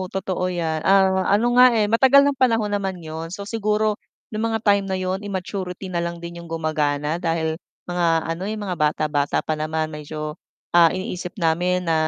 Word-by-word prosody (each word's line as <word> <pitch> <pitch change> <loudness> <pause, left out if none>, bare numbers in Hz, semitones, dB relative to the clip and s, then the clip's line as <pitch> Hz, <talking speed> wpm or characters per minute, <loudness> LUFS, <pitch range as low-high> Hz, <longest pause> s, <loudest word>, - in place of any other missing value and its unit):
totoo 185 -1 -2
'yan, 165 -3 -2
ah, 190 0 +3
ano 225 +4 +3
nga 255 - +9
eh, 215 - +3
matagal 265 +6 +5
ng 285 -2 0
panahon 225 -4 +2
naman 195 -2 -1
'yon, 160 0 -7
so 200 +3 -7
siguro, 215 0 0 0.3
yung 215 +1 -2
mga 225 - 0
time 200 -1 +4
na 190 0 -1
yun 185 +1 -2
immaturity 190 -1 -5
na 170 - 0
lang 170 0 -4
din 170 0 -8
'yong 170 - -11
gumagana 155 0 -1
dahil, 160 -1 -1 0.3
mga 175 -1 0 0.2
ano, 165 +2 -4
eh, 220 - -3
mga 195 -4 -3
bata-bata 150 -2 0
pa 155 - 0
naman 155 +1 -2
medyo, 150 0 -6 0.4
ah, 170 -1 +7
iniisip 180 -1 -5
namin 180 +2 +1
na 165 - +2
180 Hz, 185 wpm, -22 LUFS, 160-200 Hz, 0.4 s, nga